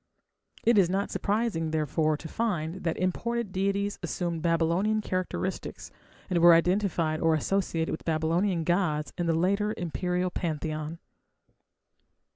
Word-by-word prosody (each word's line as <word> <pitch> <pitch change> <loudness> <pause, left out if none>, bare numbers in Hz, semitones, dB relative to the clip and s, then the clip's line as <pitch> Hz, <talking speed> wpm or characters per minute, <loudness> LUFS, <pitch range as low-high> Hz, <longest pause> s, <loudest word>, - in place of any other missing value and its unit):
It 230 -2 +5
is 180 -3 +4
not 195 +2 -1
surprising, 205 -6 0
therefore, 155 0 +1
to 160 - -8
find 180 -4 -2
that 165 - 0
imported 230 +4 -1
deities 200 +2 -1
assumed 170 -2 -2
Babylonian 170 +6 +2
characteristics, 185 -1 -3 0.4
and 180 -3 +1
were 170 0 +8
identified 170 -3 +1
or 165 -1 +4
associated 165 0 0
with 160 - -4
Babylonian 165 +3 +1
gods 160 -3 0
in 175 - -2
the 165 - +2
later 200 +5 +1
imperial 180 +1 -1
pantheon. 155 -1 -3
175 Hz, 125 wpm, -28 LUFS, 160-195 Hz, 0.4 s, were